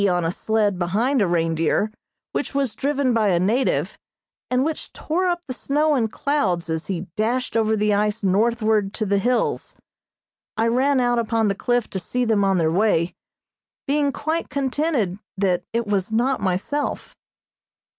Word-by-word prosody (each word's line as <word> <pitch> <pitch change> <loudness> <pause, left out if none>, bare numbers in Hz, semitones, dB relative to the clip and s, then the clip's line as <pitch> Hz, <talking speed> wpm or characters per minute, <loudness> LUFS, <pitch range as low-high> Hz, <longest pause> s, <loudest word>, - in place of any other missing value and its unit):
on 175 -2 +1
a 165 - +1
sled 205 -1 0
behind 225 +9 +1
a 200 - +3
reindeer, 165 +4 +1 0.4
which - - -3
was 275 -5 0
driven 280 -2 0
by 220 -2 +2
a 175 -3 +3
native, 225 +9 0 0.5
and 255 +2 +2
which 315 0 -4
tore 360 +4 -1
up 350 -1 -1
the 255 - -3
snow 300 +4 +1
in 240 -5 +2
clouds 210 - -1
as 160 0 -3
he 185 -4 -2
dashed 240 +4 -1
over 220 -1 +2
the 210 0 +2
ice 210 +1 0
northward 215 +1 +1
to 215 - -1
the 200 0 +2
hills. 245 +4 0 0.8
I 225 +1 +2
ran 265 +3 +2
out 245 -1 +2
upon 225 -1 +1
the - - +1
cliff 240 +3 0
to 190 - -2
see 245 +7 -2
them 220 -3 +2
on 195 -1 +2
their 160 -2 +2
way, 180 -2 +2 0.7
being 285 0 +1
quite 315 +4 -2
contented 265 - -1 0.2
that 180 -2 +1
it 235 0 -1
was 200 -1 -1
not 245 +4 +1
myself. 200 +10 -2
220 Hz, 165 wpm, -22 LUFS, 195-260 Hz, 0.8 s, a